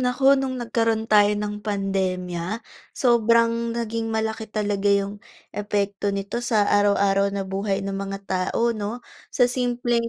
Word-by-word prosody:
naku 250 +1 -1 0.2
no'ng 260 -1 -2
nagkaroon 230 -2 0
tayo 210 -2 +5
ng 210 0 -4
pandemya, 190 -1 -2 0.3
sobrang 230 -2 +2
naging 230 -1 -2
malaki 220 0 -2
talaga 205 -1 -1
yung 200 0 +1 0.3
epekto 205 -1 -1
nito 200 +4 -3
sa 225 -4 +2
araw-araw 200 -1 +3
na 200 0 -3
buhay 195 +1 -2
ng 195 - -3
mga 195 0 -4
tao 190 +6 0
'no. 220 +2 -5 0.2
Sa 250 - +3
simpleng 245 -1 0
210 Hz, 135 wpm, -23 LUFS, 200-230 Hz, 0.3 s, tayo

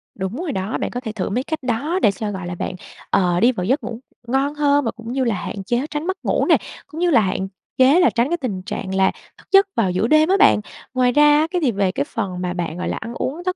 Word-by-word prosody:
Đúng 190 +2 -4
rồi 350 -4 -3
đó. 190 -2 -2
Bạn - - -3
có 245 - -3
thể 225 -4 -5
thử 210 -4 -3
mấy 245 +6 -1
cách 310 0 -4
đó 280 +9 -1
để 200 - +5
cho, 210 +1 -4
gọi 190 -3 -5
là, 175 - -4
bạn, 175 - -4 0.3
ờ, 175 -2 +2
đi 240 +5 +5
vào 185 -8 -4
giấc 265 +8 +1
ngủ 230 0 -5 0.3
ngon 270 +4 0
hơn 290 -1 +2
và 225 - 0
cũng 230 0 -9
như 265 0 0
là 230 -4 +1
hạn 195 +2 -5
chế 240 +7 -1
tránh 300 +2 -4
mất 375 - -1
ngủ - - +1
nè. - - +5 0.3
Cũng 315 - -9
như 355 - +3
là 260 -9 +5
hạn 190 -1 -1 0.3
chế 270 +7 +6
là 360 - +5
tránh 240 +3 0
cái 345 - 0
tình 210 - -4
trạng 190 -1 -4
là 190 0 +3 0.3
thức - - -21
giấc 390 0 +6
vào 200 -6 +1
giữa 185 +5 0
đêm 310 +4 +4
á 390 - +4
bạn. 415 - +6 0.3
Ngoài 250 -1 +3
ra 295 +2 +5
á, 315 - +2
cái 360 -2 0
việc 265 - +2
về 195 -3 0
cái 140 - -1
phần 185 -3 -4
mà 180 -1 -2
bạn, 175 -2 -4
gọi 180 - -3
là, - - -2
ăn 230 +2 -6
uống 295 +7 -4
thất 365 0 0
240 Hz, 290 wpm, -21 LUFS, 190-295 Hz, 0.3 s, chế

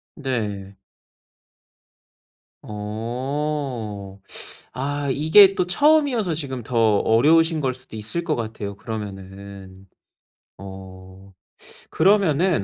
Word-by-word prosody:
네. 105 - -4 1.8
어. 115 -1 -4 0.5
아, 145 +3 -3
이게 185 +8 +6
또 180 - +1
처음이어서 275 - +3
지금 135 -5 -4
더 120 +2 -5 0.2
어려우신 160 +9 +3
거일 130 -3 -1
수도 130 -2 -11
있을 110 +11 -3
것 155 -2 0
같아요 110 -3 -5
그러면은. 100 -3 -8 0.7
어. 95 0 -12 0.6
그러면은 180 - +3
120 Hz, 175 characters per minute, -22 LUFS, 100-155 Hz, 1.8 s, 이게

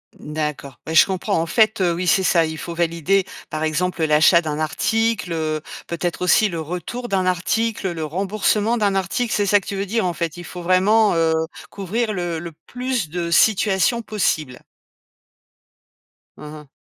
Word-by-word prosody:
D'accord, 150 -3 -5
bah, 160 - -4
je 160 - +7
comprends, 190 0 -1
en - - -1
fait, 215 +2 +2
heu, 175 -2 +2
oui, 180 +2 -3
c'est 195 0 +3
ça, 170 -2 +3
il 160 0 -5
faut 170 - -6
valider, 170 +3 +1 0.2
par 155 0 -3
exemple, 165 +2 -1
l'achat 155 +3 +5
d'un 155 -3 -3
article, 220 +5 0
heu, 155 -1 -2 0.3
peut-être 170 +1 -3
aussi 180 +4 +4
le 170 -4 -4
retour 180 +10 -5
d'un 190 -2 0
article, 190 +3 0
le 160 -2 -4
remboursement 205 +6 0
d'un 205 -2 +1
article, 195 +5 -1
c'est 205 - +1
ça 205 +1 +4
que - - -16
tu 200 - -4
veux 195 +1 -2
dire? 220 +1 -1
En 175 - 0
fait, 170 0 -4
il 175 - -8
faut 180 - -8
vraiment, 200 +5 +3
heu, 165 -1 +2 0.4
couvrir 215 +3 -2
le 175 -3 -3
le 170 0 -8
plus 250 -8 -3
de 170 0 -3
situations 215 +3 +3
possibles. 155 - -2 1.8
Mmh 150 0 -9
mh. 150 -1 -11
180 Hz, 180 wpm, -21 LUFS, 160-205 Hz, 1.8 s, je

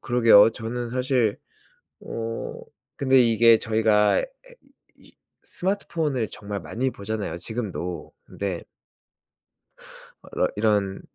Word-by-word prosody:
그러게요. 115 -4 +6
저는 115 +1 -5
사실 125 -4 0 0.6
어 115 0 -5 0.4
근데 130 -1 +4
이게 115 -1 +5
저희가 110 -2 +2
에 - - -4 0.7
이 - - -20
이 - - -36 0.3
스마트폰을 165 - -2
정말 100 -1 -6
많이 125 +10 -2
보잖아요 105 -4 -5
지금도. 90 -3 -5
근데 95 -4 -5 1.7
러 - - +1
이런 105 -3 +1
115 Hz, 215 characters per minute, -24 LUFS, 105-125 Hz, 1.7 s, 그러게요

